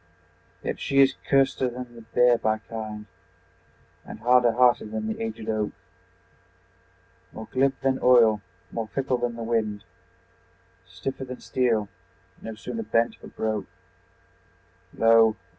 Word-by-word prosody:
Yet - - -2
is - - -19
she 140 -1 +4 0.2
curster 135 -1 +3
than 125 0 -8
the 115 - -12
bear 120 +1 +3
by 110 -1 +1
kind, 110 -1 -7 1.0
And - - -9
harder 125 -1 +4
hearted 120 -3 +3
than 110 0 -3
the 110 - -1
agĶd 110 -1 -6
oak, 110 -1 -1 1.6
More 110 - -9
glib 135 +1 +1
than 135 0 +1
oil, 115 -4 +5 0.3
more 115 -1 -3
fickle 130 +3 -1
than 120 -1 -2
the 115 - -6
wind, 110 -3 -1 1.0
Stiffer 95 +10 -5
than 125 0 -8
steel, 115 -5 0 0.5
no 110 -1 -7
sooner 225 - -5
bent 115 - 0
but - - -13
broke. 110 -2 -2 1.2
Lo! 115 -1 +5
115 Hz, 130 wpm, -25 LUFS, 110-125 Hz, 1.6 s, oil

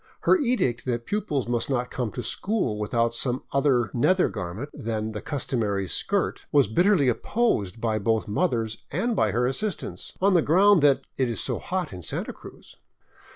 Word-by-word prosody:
Her - - +5
edict 235 - 0
that 120 -2 -2
pupils 175 - -2
must 120 +1 -1
not 125 -2 -1
come 125 -3 -2
to 125 - -4
school 155 - -1
without 115 +2 0
some 125 +1 -1
other 135 -5 +2
nether 185 +10 +3
garment 100 +7 -5
than 110 -1 -3
the 105 - -6
customary 110 -8 -2
skirt 200 - -1
was 140 -6 +4
bit 175 - +2
terly 180 -10 +4
opposed 115 - 0
both 110 -1 0
by - - -7
mothers 115 - 0
and 220 - -1
by - - +2
her 120 +1 +1
assistants, 190 +11 -3
on 195 +1 +3
the 175 - +5
ground 190 +4 +5
that 140 -2 +4
" - - -46
it 130 -2 +2
is 115 - -3
so - - -1
hot 180 - -3
in 90 - -7
Santa 75 - -4
Cruz." - - -14
125 Hz, 185 wpm, -25 LUFS, 110-180 Hz, -, Her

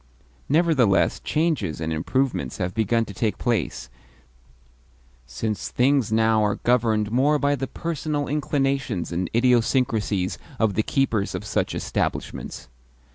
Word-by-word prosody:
Nevertheless 135 - +3
changes 150 - -1
and 80 0 -2
improvements 80 - -1
have 90 0 -2
begun 115 +1 +1
to 100 - -9
take 105 +2 -1
place, 115 - -1 1.4
since 105 - -3
things 130 -2 +2
now 110 0 +3
are 105 -1 +1
governed 110 -4 +1
more 140 +5 +3
by 145 0 +1
the 135 -1 -2
personal 155 -3 -3
inclinations 135 - -1
and 85 +1 -2
idiosyncracies 115 -5 +1 0.2
of 110 -3 +2
the 110 - +2
keepers 110 -4 0
of - - -5
such - - -1
establishments. - - -3
115 Hz, 125 wpm, -24 LUFS, 100-135 Hz, 1.4 s, Nevertheless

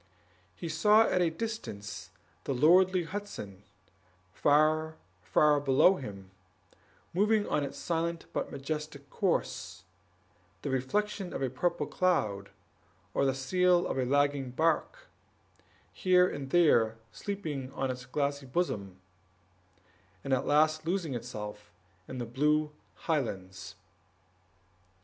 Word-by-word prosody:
He 170 - -6
saw 210 +6 +5
at 180 - +1
a 170 - +3
distance 160 - -6 0.4
the 135 - -1
lordly 180 +6 +5
Hudson, 165 - -7 0.7
far, 155 +2 +3 0.3
far 150 +10 +3
below 145 +7 +4
him, 100 -7 -9 0.8
moving 210 +3 +2
on 150 - 0
its 140 - -5
silent 170 0 -2
but - - -2
majestic 140 0 -5
course, - - -2 0.7
with - - -37
the 145 - -2
reflection 190 - -1
of - - -3
a 130 - -1
purple 150 +3 -1
cloud, 110 - 0 0.6
or 140 - +2
the 135 -1 +1
sail 180 +6 +2
of - - -2
a 130 - +1
lagging 140 0 +1
bark, 160 +5 0 0.9
here 180 -1 +4
and 140 -6 -5
there 120 -10 +4
sleeping 155 -10 -5
on 135 -1 -1
its 125 0 -7
glassy 140 0 -2
bosom, 100 - -2 1.2
and 135 - -1
at 130 - 0
last 155 +1 +3
losing 170 -3 -1
itself 105 -3 -7 0.4
in 130 - -7
the 120 - -3
blue 150 +5 +1 0.3
highlands. 95 - -3
145 Hz, 120 wpm, -30 LUFS, 125-175 Hz, 1.2 s, saw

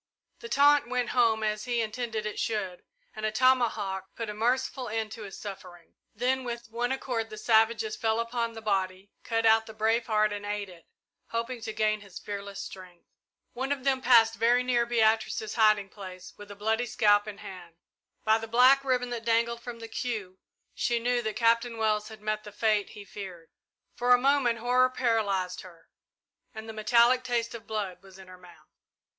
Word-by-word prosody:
The 460 - -9
taunt 290 - +4
went 250 -1 -1
home, 230 -3 +2
as 215 0 -1
he 240 -1 0
intended 225 -1 -3
it 215 - -4
should, 195 -5 -3 0.3
and 215 - -7
a 215 - 0
tomahawk 215 -6 +1
put 225 -2 -4
a - - -6
merciful 250 +3 -1
end 220 0 -3
to 225 - -8
his 200 -2 -8
suffering. 180 -4 -10 0.2
Then 255 +4 0
with 235 -2 -6
one 240 +2 -1
accord 245 -4 -2
the 215 - -9
savages 230 - +2
fell 225 - 0
upon 230 0 -2
the 225 -1 -9
body, 190 -1 -2
cut 225 -1 -1
out 220 0 +5
the 220 - -10
brave 225 +2 +1
heart 215 -1 +2
and 205 0 -6
ate 205 -1 -3
it, 170 -3 -16 0.4
hoping 230 +1 -4
to 220 0 -4
gain 215 -1 0
his 200 -3 -12
fearless 200 -1 -6
strength. 180 -2 -10 0.5
One 265 +3 -3
of 280 -2 -2
them 265 -1 +1
passed 230 -3 +6
very 240 +2 +3
near 240 -1 +1
Beatrice's 220 -2 +1
hiding 215 -3 +3
place 185 -3 -10
with 205 0 -12
a 205 - -9
bloody 220 +4 0
scalp 205 -1 +3
in 205 -1 -7
his - - -13
hand. 175 -3 -10 0.5
By 220 +1 +3
the 225 - -6
black 255 +4 +5
ribbon 250 -2 0
that 235 -2 -4
dangled 235 +1 +1
from 240 -1 -7
the 230 0 -8
queue, 215 -6 -4 0.3
she 240 - 0
knew 245 +1 0
that 220 -2 -3
Captain 230 0 +2
Wells 215 -1 0
had 220 -1 -11
met 215 0 -2
the 210 - -10
fate 210 -1 +1
he 205 - -9
feared. 185 -5 -9 0.4
For 245 +1 +4
a - - +2
moment 265 -2 +2
horror 250 +2 +3
paralysed 215 -7 0
her, 170 -3 -16 0.7
and 220 0 -8
the 220 - -7
metallic 235 +4 +4
taste 240 -2 -1
of 230 -2 -9
blood 205 -4 -4
was 195 -1 -16
in 190 -1 -13
her 185 0 -13
mouth. 180 -1 -18
225 Hz, 195 wpm, -28 LUFS, 205-240 Hz, 0.7 s, passed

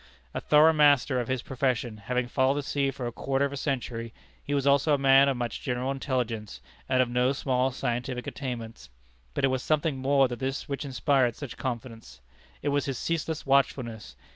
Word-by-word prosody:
A - - -3
thorough 155 +2 +5
master 145 -4 +4
of 120 - -3
his 130 -2 -2
profession, 125 -4 -1
having 125 +4 -2
followed 130 +2 +2
the 145 - -2
sea 140 0 0
for 130 -2 -5
a 120 - -2
quarter 135 +3 0
of 140 - -4
a - - -4
century, 120 -5 -3 0.3
he 145 - -2
was 140 -1 0
also 140 +2 +4
a - - -1
man 135 0 +6
of 135 - -1
much 120 -2 -3
general 125 -1 -2
intelligence, 120 - -3 0.3
and 130 -1 +4
of - - -4
no 125 +2 +1
small 130 -1 0
scientific 125 -1 -3
attainments. 120 - -6 0.5
But - - +2
it - - +2
was 130 -1 -1
something 155 -1 0
more 135 0 +3
than 120 -1 -6
this 135 +1 -3
which 140 +1 -4
inspired 130 -1 +1
such 145 -5 -7
confidence. 115 - -6 0.4
It 145 - +1
was 145 -1 +1
his 135 -3 -3
ceaseless 160 0 -2
watchfulness. 120 - 0
130 Hz, 195 wpm, -27 LUFS, 120-140 Hz, 0.5 s, man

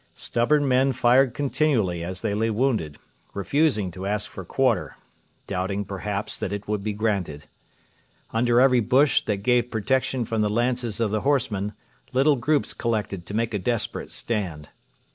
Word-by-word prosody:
Stubborn 145 +5 +1
men 130 +1 +3
fired 125 +1 +3
continually 130 - 0
as 90 +2 -5
they 100 - -1
lay 110 +2 0
wounded, 110 - 0 0.4
refusing 105 - +1
to 95 +3 -6
ask 105 +1 -2
for 95 - -7
quarter 130 +5 0 0.5
doubting, 100 +1 -2
perhaps, 100 +1 -4
that - - -3
it 100 0 -5
would 105 -1 -1
be 105 +2 -2
granted. 100 -8 -2 0.9
Under 120 +1 +3
every 130 -1 +5
bush 130 +5 +3
that 100 -2 -2
gave 125 +1 +2
protection 125 +2 0
from 110 0 -1
the 105 - +2
lances 120 0 -1
of 115 -3 +1
the 110 0 0
horsemen 110 -8 0 0.4
little 140 +3 +4
groups 145 +4 0
collected 105 -6 -2
to 100 - -5
make 115 0 0
a 105 - 0
desperate 115 +2 -2
stand. 90 -10 -3
110 Hz, 160 wpm, -24 LUFS, 100-125 Hz, 0.9 s, every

